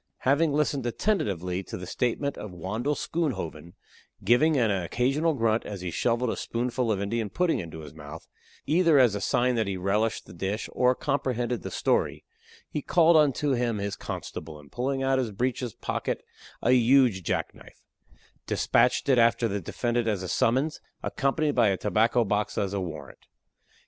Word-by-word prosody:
Having 145 +3 +2
listened 145 -2 0
attentively 100 - -1
to - - -7
the 90 - -7
statement 125 +8 -1
of 105 - -7
Wandle 110 - -2
Schoonhoven, 95 - -3 0.5
giving 145 +6 +4
an 115 -4 +2
occasional 130 - 0
grunt, 115 -2 +1
as 100 -3 -7
he 90 -1 -4
shoveled 120 +3 0
a - - -3
spoonful 120 0 -2
of 100 - 0
Indian 105 +2 -2
pudding 180 - +1
into 80 -2 -7
his 75 -1 -10
mouth 75 +1 -10 0.4
either 165 0 +4
as 125 -6 +5
a 100 - -3
sign 125 +5 +2
that 110 -3 0
he 95 -1 -2
relished 105 +4 0
the - - -13
dish, 95 +5 -3
or 125 0 +2
comprehended 125 -4 -1
the - - -5
story - - 0 0.4
he 150 - -4
called 170 +2 +4
unto 145 -1 +3
him 120 -3 0
his 100 0 -3
constable, 75 -1 -7
and 70 -1 -17
pulling 135 +2 -2
out 135 0 +2
of 130 - +1
his 110 - -7
breeches 120 +2 -2
pocket - - -3 0.4
a 125 - +3
huge 125 -4 +4
jack - - -2
knife, - - -17 0.6
despatched - - +2
it 130 -3 +4
after 115 0 +3
the 100 -1 -3
defendant 120 +6 -1
as 100 -4 -1
a - - -4
summons, 130 - +1 0.2
accompanied 145 +2 0
by 115 -5 +4
his 95 - 0
tobacco 115 +4 +2
box 105 +1 -1
as 100 -1 -1
a 100 - -1
warrant. 80 -6 -8
115 Hz, 175 wpm, -27 LUFS, 100-135 Hz, 0.6 s, as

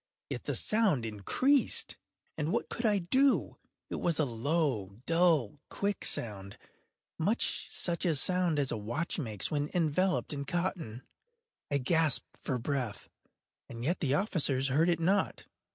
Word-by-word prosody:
Yet - - -5
the - - -2
sound 210 - +2
increased—and 150 - 0
what - - -1
could 235 -1 -1
I 210 -1 +3
do? 260 +10 +2 0.3
It - - -2
was 170 -3 0
a 155 - +2
low, 120 - -1
dull, 165 - +2
quick 200 0 -2
sound—much 110 - -3
such 170 +1 -1
a 165 -3 +2
sound 180 +2 +2
as 140 -3 +1
a - - -2
watch 120 - -3
makes 110 - -2
when 145 -1 -1
enveloped 180 +2 +1
in 140 -1 -4
cotton. 170 - -3 0.7
I 140 - +1
gasped 155 +2 +2
for 130 - -1
breath—and 120 -2 -7
yet 170 +8 0
the 140 -3 +1
officers 145 -8 +1
heard 155 +6 +3
it 170 -2 +1
not. 190 +5 0
155 Hz, 135 wpm, -31 LUFS, 125-180 Hz, 0.7 s, I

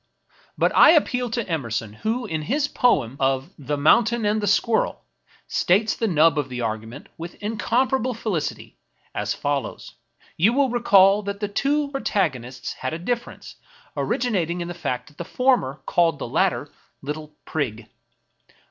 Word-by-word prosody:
" - - -32
But - - +2
I - - +8
appeal 250 -6 +1
to 230 -1 -3
Emerson, 115 - -3
who, 225 - -2
in 160 -1 -3
his 280 - 0
poem 140 - +1
of 135 0 0
" - - -41
The 145 - +1
Mountain 225 +10 +3
and 210 +1 +1
the 205 - -1
Squirrel," 220 +3 +1 0.4
states 205 +5 +2
the 225 - -1
nub 160 -4 +4
of 140 -2 -3
the 125 -1 -5
argument, 110 +4 -5
with 170 +1 -7
incomparable 245 +3 0
feUcity, 205 -9 -4 0.4
as - - -2
follows: 145 -2 -3 0.2
— - - -31
you 205 +8 +4
will 270 -1 +2
recall 200 -4 +5
that 200 0 -5
the 205 - -1
two 280 +7 0
protagonists 135 - -2
had 130 +4 -4
a - - -3
difference, 235 +7 -5 0.4
originating 180 -8 -1
in 170 - -4
the 175 - -5
fact 145 -8 -4
that 150 - -19
the - - -3
former 205 - +1
called 165 -3 +2
the 140 - -5
latter 160 +2 0 0.2
'* - - -44
Little 150 +1 -6
Prig." 115 -8 -3
175 Hz, 165 wpm, -23 LUFS, 145-235 Hz, 0.4 s, I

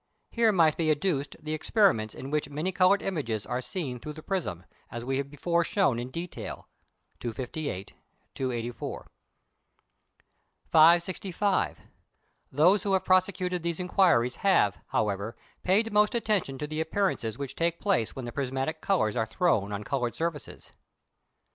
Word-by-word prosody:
Here 230 -2 +3
might 165 -6 +3
be 160 -2 +1
adduced 150 -2 0
the 155 -1 -4
experiments 155 - +2
in 135 +2 -7
which 150 -2 -1
many 155 +6 -2
coloured 185 +2 +3
images 120 - -2
are 125 - -2
seen 130 -5 -4
through 150 +5 -7
the 155 0 -11
prism, 95 - -3 0.2
as 120 0 -6
we 135 +1 0
have 140 0 -3
before 170 +4 0
shown 185 - +1
in 120 +1 -5
detail 170 +6 -7 0.5
(258, 120 -3 -5 0.4
284). 120 -2 -4 1.6
565. 175 +4 +3 0.7
Those 175 +8 +4
who 195 0 -1
have 190 - +1
prosecuted 185 -1 +2
these 170 0 -2
inquiries 175 -10 +3
have, 180 - +3
however, 105 +1 -1 0.2
paid 210 +4 +2
most 210 +2 +4
attention 210 - 0
to 150 - -3
the 155 +1 -3
appearances 160 - -1
which 140 -2 -5
take 170 0 0
place 190 - 0
when 130 - -5
the 120 - -5
prismatic 135 +4 -2
colours 150 - +1
are 115 -2 0
thrown 110 - +1
on 100 0 -4
coloured 120 -1 -2
surfaces. 165 -4 -5
155 Hz, 145 wpm, -28 LUFS, 125-185 Hz, 1.6 s, Those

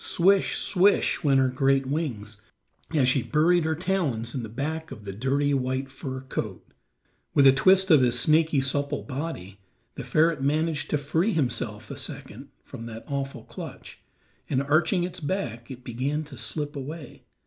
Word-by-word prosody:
"Swish, 195 +2 +3
swish," 195 +2 +2
went 135 -3 +4
her 130 - +4
great 135 +1 +2
wings, 130 -8 -3 0.6
as 135 -4 +4
she 130 +1 +3
buried 155 +8 +2
her 160 0 +1
talons 155 -11 -1
in 130 - -3
the 110 - -7
back 160 +7 -4
of 105 - -10
the 100 - -4
dirty 140 +6 0
white 130 0 -1
fur 130 -1 -6
coat. 130 - -5 0.7
With 140 - +6
a 135 - +10
twist 190 +6 +4
of 150 -4 +7
his 125 -1 +3
snaky, 155 +1 +3
supple 140 +2 -1
body, 130 - -6 0.3
the - - -6
ferret 155 -2 +2
managed 150 +1 0
to 150 - +2
free 160 +9 0
himself 125 -7 -2
a - - -6
second - - -7
from 115 - -9
that 115 0 -8
awful 140 -1 -4
clutch, - - -9 0.5
and 135 -1 +1
arching 155 +5 +2
its 180 - -5
back, 140 - -3
it 130 -2 -9
began 135 +6 -2
to 145 -2 -11
slip 145 +3 -3
away. 145 +1 -7
140 Hz, 170 wpm, -26 LUFS, 130-160 Hz, 0.7 s, a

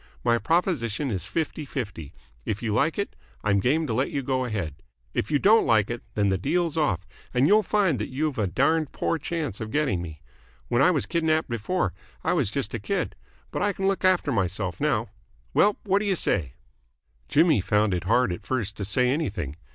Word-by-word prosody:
My 120 -1 +3
proposition 150 - 0
is 95 -4 -3
fifty 155 +5 -2
fifty. 100 - -5 0.3
If 105 - -3
you 110 -2 0
like 160 +9 +1
it, 200 - -3 0.3
I'm 100 -1 +3
game 150 +10 +2
to 120 - -2
let 130 +5 +1
you 140 - -2
go 130 0 0
ahead. 95 - -4 0.3
If - - -1
you 150 - +3
don't 215 +9 +5
like 110 -1 +3
it, 120 - -4
then 100 -1 +2
the 95 -1 +1
deal's 170 - 0
off, 100 - 0 0.3
and 125 +2 +4
you'll 210 +6 +6
find 195 -7 +1
that - - -3
you've 145 0 -2
a 105 - +1
darned 150 - +1
poor 165 - -1
chance 150 - -3
of 110 - -4
getting 135 - 0
me. 80 -4 -8 0.5
When 120 - +2
I 175 - +6
was 155 -6 +1
kidnapped 160 -3 +1
before, 115 - -1 0.3
I - - +2
was - - +2
just - - -2
a - - -2
kid, - - -2 0.4
but - - -3
I 205 +1 +2
can 195 0 -1
look 195 0 0
after 185 -5 +3
myself 95 -4 -1
now. 120 -8 +1 0.4
Well, 205 0 +4
what 200 -1 +2
do 210 - -3
you 195 -2 +2
say?" 75 - 0 0.8
Jimmy 155 - +4
found 105 +1 +2
it 90 -1 -2
hard 120 0 +3
at 85 - -7
first 110 -6 -2
to 100 - -3
say 125 +6 +2
anything. 100 - -2
130 Hz, 205 wpm, -26 LUFS, 100-160 Hz, 0.8 s, you'll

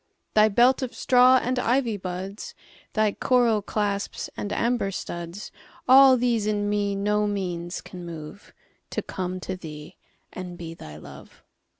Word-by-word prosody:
Thy 215 0 +5
belt 245 +6 +4
of 255 -2 -4
straw 255 +2 +5
and 250 +1 -1
ivy 245 -2 +1
buds, 190 +1 -6 0.4
Thy 215 -1 +2
coral 235 -2 +2
clasps 200 0 -3
and 205 - -4
amber 235 -3 0
studs,—All 210 +9 +2
these 235 -3 +1
in 205 -1 0
me 205 -1 0
no 210 +1 +1
means 180 -3 -3
can 180 -1 -10
moveTo 165 +2 -9
come 185 0 -4
to 185 - -4
thee 150 -4 -10 0.4
and 180 -1 -7
be 165 -1 -7
thy 75 - -11
Love. - - -13
205 Hz, 135 wpm, -25 LUFS, 180-235 Hz, 0.4 s, Thy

